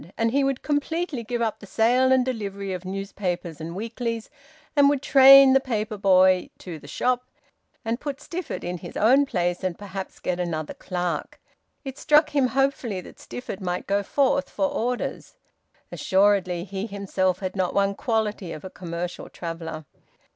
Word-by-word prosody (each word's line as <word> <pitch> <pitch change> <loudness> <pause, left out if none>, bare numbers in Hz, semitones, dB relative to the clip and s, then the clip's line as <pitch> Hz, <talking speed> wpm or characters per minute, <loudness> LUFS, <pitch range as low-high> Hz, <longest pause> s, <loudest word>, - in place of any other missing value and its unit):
And 230 0 +1
he 280 +2 +2
would 270 -1 -1
completely 295 -2 -1
give 235 +1 -2
up 220 -2 -2
the 205 - -12
sale 245 +5 +3
and 260 -1 +4
delivery 200 -6 -4
of 185 0 -6
newspapers 185 -4 -4
and 165 +2 -6
weeklies, 230 +2 -4 0.4
and 285 -1 +6
would 285 -1 0
train 275 -1 +9
the 270 - +6
paper 220 -5 -3
boy 185 -2 +4
to 170 -4 -8
the 145 - -14
shop, 250 - 0 0.6
and 230 +2 -1
put 285 -1 -5
Stifford 345 +2 -5
in 175 0 -4
his 175 - -8
own 265 +6 +4
place 175 -4 -1
and 185 -2 -2
perhaps 195 -1 -7
get 180 0 -2
another 160 -3 -3
clerk. 180 -2 -4 0.5
It 270 0 -6
struck 300 +1 +4
him 280 -3 +3
hopefully 265 -6 0
that - - -14
Stifford 230 -5 -7
might 180 -1 -3
go 200 +1 +1
forth 275 +6 +1
for 290 - -1
orders. 250 - -3 0.6
Assuredly 190 -3 +2
he 195 +2 -5
himself 195 -3 -1
had 185 0 -5
not 185 -2 -1
one 200 0 +2
quality 215 -5 -2
of 155 - -8
a 190 - -7
commercial 175 0 -6
traveller. 165 -2 -6
205 Hz, 170 wpm, -25 LUFS, 185-260 Hz, 0.6 s, train